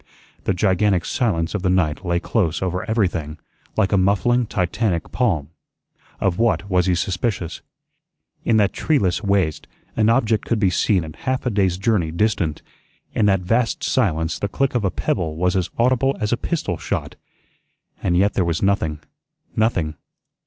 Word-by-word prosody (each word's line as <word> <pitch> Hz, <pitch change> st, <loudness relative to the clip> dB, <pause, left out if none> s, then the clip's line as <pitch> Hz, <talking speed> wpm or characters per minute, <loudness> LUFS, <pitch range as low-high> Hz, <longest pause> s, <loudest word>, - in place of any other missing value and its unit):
The 95 Hz, -, +1 dB
gigantic 95 Hz, 0 st, +2 dB
silence 85 Hz, -9 st, 0 dB
of 105 Hz, -, -2 dB
the 90 Hz, -, +1 dB
night 90 Hz, -2 st, +1 dB
lay 85 Hz, -1 st, 0 dB
close 90 Hz, -4 st, 0 dB
over 90 Hz, 0 st, -2 dB
everything, 90 Hz, -9 st, 0 dB, 0.4 s
like 105 Hz, -3 st, +2 dB
a 100 Hz, -, +4 dB
muffling 115 Hz, +6 st, +2 dB
Titanic 90 Hz, -2 st, -1 dB
palm. 85 Hz, -, 0 dB, 0.7 s
Of 95 Hz, +1 st, 0 dB
what 115 Hz, -3 st, +1 dB
was 90 Hz, -2 st, +2 dB
he 90 Hz, -, +3 dB
suspicious? 90 Hz, 0 st, -2 dB, 0.8 s
In 115 Hz, -, +3 dB
that 105 Hz, -2 st, +3 dB
treeless 100 Hz, -, +1 dB
waste 100 Hz, -7 st, 0 dB, 0.3 s
an 110 Hz, 0 st, +3 dB
object 115 Hz, -3 st, +2 dB
could 115 Hz, -, 0 dB
be 100 Hz, -4 st, +2 dB
seen 90 Hz, 0 st, +2 dB
at 75 Hz, -1 st, -9 dB
half 130 Hz, 0 st, 0 dB
a 125 Hz, -, +1 dB
day's 95 Hz, -4 st, +1 dB
journey 95 Hz, -4 st, +1 dB
distant. 85 Hz, -3 st, 0 dB, 0.5 s
In 105 Hz, -, +2 dB
that 95 Hz, -2 st, +3 dB
vast 115 Hz, +5 st, 0 dB
silence 80 Hz, -, 0 dB
the 100 Hz, -, -1 dB
click 135 Hz, +7 st, 0 dB
of 120 Hz, -4 st, 0 dB
a 95 Hz, -, +2 dB
pebble 80 Hz, -2 st, -2 dB
was 90 Hz, +3 st, +1 dB
as 95 Hz, -2 st, 0 dB
audible 130 Hz, +3 st, +2 dB
as 105 Hz, +2 st, 0 dB
a -, -, +4 dB
pistol 120 Hz, -, -2 dB
shot. -, -, -3 dB, 0.9 s
And 90 Hz, -, +1 dB
yet 100 Hz, +3 st, +3 dB
there 95 Hz, -, +1 dB
was 85 Hz, +1 st, -1 dB
nothing, 80 Hz, -7 st, 0 dB, 0.5 s
nothing. 90 Hz, -9 st, +1 dB
95 Hz, 165 wpm, -21 LUFS, 85-110 Hz, 0.9 s, a